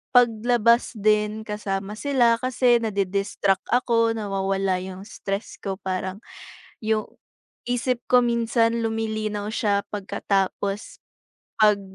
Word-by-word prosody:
paglabas 235 0 +4
din 210 +1 +1
kasama 205 -1 -3
sila. 245 -5 +3
Kasi 250 -1 +3
nadi-distract 200 -2 0
ako, 230 -2 +2
nawawala 195 -2 -1
'yong 185 +1 -7
stress 200 -1 -5
ko. 195 -1 -3
Parang 190 +1 -4 0.6
'yong 220 -1 -1 0.6
isip 245 0 0
ko 250 -1 +5
minsan 235 -1 +1
lumilinaw 215 -2 -2
siya, 205 -2 +1
pagkatapos 200 0 -2 0.6
'pag 210 -2 +5
215 Hz, 100 wpm, -24 LUFS, 195-235 Hz, 0.6 s, ko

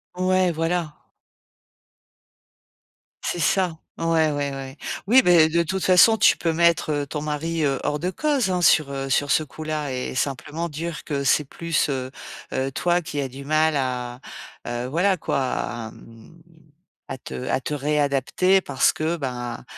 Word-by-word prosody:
Ouais, 185 0 +2
voilà. 165 -1 -1 2.3
C'est 175 - -2
ça, 175 -1 +1 0.2
ouais, 165 -2 +2
ouais, 145 -1 -2
ouais. 135 0 -7 0.3
Oui, 255 +4 +7
beh, 170 -5 +5
de 170 +1 +2
toute 185 +1 -3
façon, 190 +5 +6
tu 195 - +5
peux 165 -1 0
mettre 160 -3 +2
ton 150 +1 -5
mari, 155 +2 -2
heu, 135 -3 +1
hors 150 0 -1
de 180 +3 -1
cause 280 -5 0
hein 180 -1 0
sur, 155 -4 +4
heu, 135 0 -4
sur 140 +1 +1
ce 155 - +3
coup-là 155 -1 -4
et 125 0 -4
simplement 145 +5 -3
dire 160 +2 -5
que 140 -3 -3
c'est 140 +2 +3
plus, 165 +1 -1
heu 130 -2 -3 0.4
heu, 135 +1 -1
toi 175 +5 +1
qui 155 -3 -5
a 135 - -2
du 135 +2 -10
mal 155 +1 +2
à, 125 -2 -3 0.5
heu, 120 +1 -3
voilà 180 +6 +1
quoi - - -2
à, 120 -3 -3
mmh, 115 +9 -16 0.7
à 130 - -6
te - - -8
à 130 - 0
te 150 - -3
réadapter 150 +6 +2
parce 135 -5 +2
que 160 +2 -2
bah, 125 -4 -5
150 Hz, 165 wpm, -23 LUFS, 135-170 Hz, 2.3 s, Oui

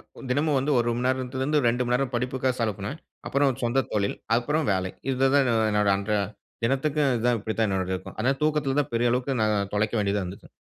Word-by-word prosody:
ஒரு - - -10
தினமும் 145 +2 +2
வந்து 140 +3 0
1 120 0 +1
மணி 125 +1 -2
நேரத்துலருந்து 130 +3 0
2 120 +2 +1
மணி 120 - 0
நேரம் 130 0 -1
படிப்புக்காக 130 +1 0
செலவுப்பண்ணேன். 110 +5 -3 0.3
அப்புறம் 140 -1 +2
சொந்த 125 +3 +2
தொழில். 100 -1 0 0.2
அப்புறம் 145 +5 0
வேலை. 95 -1 -1 0.2
இதுதான் 135 +1 +3 0.2
என்னோட 105 -1 +2
அன்ற 100 +2 -4 0.5
தினத்துக்கு 140 +4 +1
இதுதான், 120 +1 +1
இப்படித்தான் 110 +1 -1
என்னோடது 95 -1 -1
இருக்கும். 95 - -9
அதனால 135 +5 0
தூக்கத்துல 150 -3 +1
தான் 140 - -8
பெரிய 120 +1 +2
அளவுக்கு 125 +1 0
நான் 105 -2 +1
தொலைக்க 105 +2 0
வேண்டியதா 100 -1 0
இருந்துச்சு. 90 +2 -9
125 Hz, 185 wpm, -26 LUFS, 105-135 Hz, 0.5 s, இதுதான்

